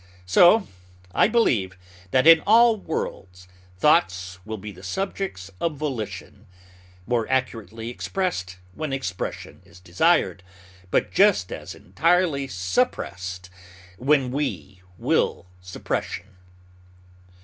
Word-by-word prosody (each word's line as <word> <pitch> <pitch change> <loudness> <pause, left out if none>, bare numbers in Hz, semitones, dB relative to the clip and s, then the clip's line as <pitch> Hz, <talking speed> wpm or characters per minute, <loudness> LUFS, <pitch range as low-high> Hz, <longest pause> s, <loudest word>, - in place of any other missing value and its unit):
So 175 - +5 0.5
I - - +4
believe 115 - +1 0.3
that 130 +7 +2
in 165 0 +9
all 230 +2 +6
worlds 90 - -6 0.3
thoughts 95 - +2
will 110 0 -5
be 105 +1 -8
the 95 - -14
subjects 100 - -4
of 165 -3 -1
volition, 110 -7 -5 0.6
more 115 -1 -1
accurately 115 -3 -2
expressed 120 - -3 0.2
when 150 +6 -4
expression 125 -9 -5
is 85 +2 -18
desired, 90 0 +1 0.5
but - - +1
just 195 - +3
as - - -7
entirely 165 -3 +1
suppressed 90 -1 -2 0.5
when 135 -1 +2
we 95 - -4 0.2
will - - 0 0.2
suppression. 90 +2 -5
115 Hz, 105 wpm, -24 LUFS, -, 0.6 s, in